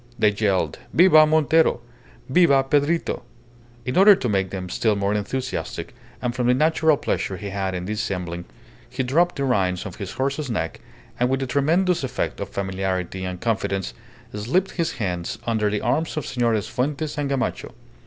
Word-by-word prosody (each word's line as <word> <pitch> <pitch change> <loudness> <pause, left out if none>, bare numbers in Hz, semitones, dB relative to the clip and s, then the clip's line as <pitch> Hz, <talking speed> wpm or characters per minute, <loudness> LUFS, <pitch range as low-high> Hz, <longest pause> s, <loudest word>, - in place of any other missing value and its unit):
They 105 - +4
yelled 100 -2 0 0.2
"Viva 155 -3 +7
Montero! 160 0 +3 0.5
Viva 140 -2 +4
Pedrito!" 145 +5 +1 0.6
In 125 - -2
order 200 +2 +8
to 125 - -3
make 95 -3 0
them 95 -1 -5
still 105 +4 +1
more 100 0 0
enthusiastic, 125 +5 -3 0.3
and 120 -1 0
from 125 -1 -1
the 125 - +4
natural 155 +1 +3
pleasure 95 - -2
he 100 0 -6
had 95 -1 -2
in 90 0 -4
dissembling, 90 -4 -3 0.4
he 130 +2 -2
dropped 170 +8 +2
the 140 - -2
reins 95 -9 0
on 95 - -6
his 95 0 -7
horse's 140 +1 -2
neck, 80 -8 -3 0.4
and 125 +1 +2
with 135 0 0
a - - -1
tremendous 160 +6 +1
effect 130 - -3
of - - -4
familiarity 95 -1 -3
and 90 -1 -5
confidence 100 - -1 0.4
slipped 130 - 0
his 170 -2 -1
hands 90 -7 -3
under 110 -3 +1
the 105 0 -1
arms 155 +7 0
of 155 - -2
Senores 115 -5 0
Fuentes 145 +4 -2
and 145 -1 -1
Gamacho. 135 -2 -2
125 Hz, 170 wpm, -23 LUFS, 100-145 Hz, 0.6 s, order